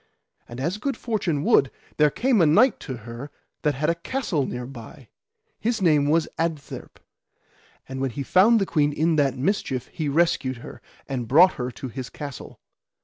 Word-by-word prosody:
And 120 +1 -8
as 170 +9 -2
good 275 +4 -2
fortune 185 - -1
would, 135 - +4 0.3
there 150 0 +5
came 240 - +2
a 165 - +5
knight 220 - +4
to 130 -3 -6
her 120 +4 -7 0.3
that 150 -3 +1
had 150 +4 -1
a 170 - +3
castle 170 - -2
thereby, 125 +2 -8 0.5
his 230 +1 0
name 150 -6 +3
was 165 +1 +3
Sir - - -11
Adtherp. 160 -4 -4 0.9
And 130 0 -5
when 135 - 0
he 140 +4 -5
found 215 - +5
the 195 - +1
queen 150 -4 +1
in 160 +2 +1
that 135 -3 +2
mischief 135 - -1
he 155 -4 -2
rescued 140 -4 +1
her, - - -10 0.3
and 125 -4 -3
brought 170 +9 +6
her 125 0 -4
to 130 - -7
his 130 0 -6
castle. 140 -4 -8
150 Hz, 180 wpm, -24 LUFS, 130-175 Hz, 0.9 s, brought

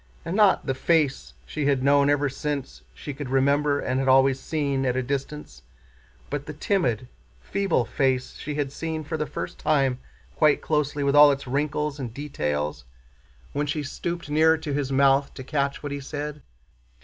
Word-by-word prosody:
And 170 - -3
not 205 -3 +4
the 135 - 0
face 135 - 0
she 140 - -2
had 135 -2 +2
known 140 0 +4
ever 145 0 +2
since 135 - -4
she 140 - -7
could 140 -1 -6
remember 140 +2 +2
and 130 0 -1
had 135 - -1
always 135 0 +5
seen 140 -2 -1
at 125 -1 0
a 130 - 0
distance, 140 - -5 0.7
but 145 0 -3
the 150 - -5
timid, 135 - 0 0.3
feeble 170 - 0
face 130 0 0
she 150 0 -5
had 145 -2 -2
seen 160 +1 -4
for 155 +2 -4
the 155 -1 -2
first - - -6
time 135 -4 +1 0.4
quite 150 -2 +4
closely, 150 -2 -1
with 140 0 +2
all 145 0 +9
its 140 0 -3
wrinkles 145 +2 -1
and 120 -4 -6
details, 75 - -3 0.7
when 145 +1 -1
she 150 +1 -2
stooped 170 +4 -4
near 160 +2 +4
to 155 -2 -5
his 140 -1 -1
mouth 135 +1 +3
to 130 - -7
catch 140 +1 -2
what 145 - -4
he 140 - -3
said. 145 +1 -6
140 Hz, 180 wpm, -25 LUFS, 135-150 Hz, 0.7 s, all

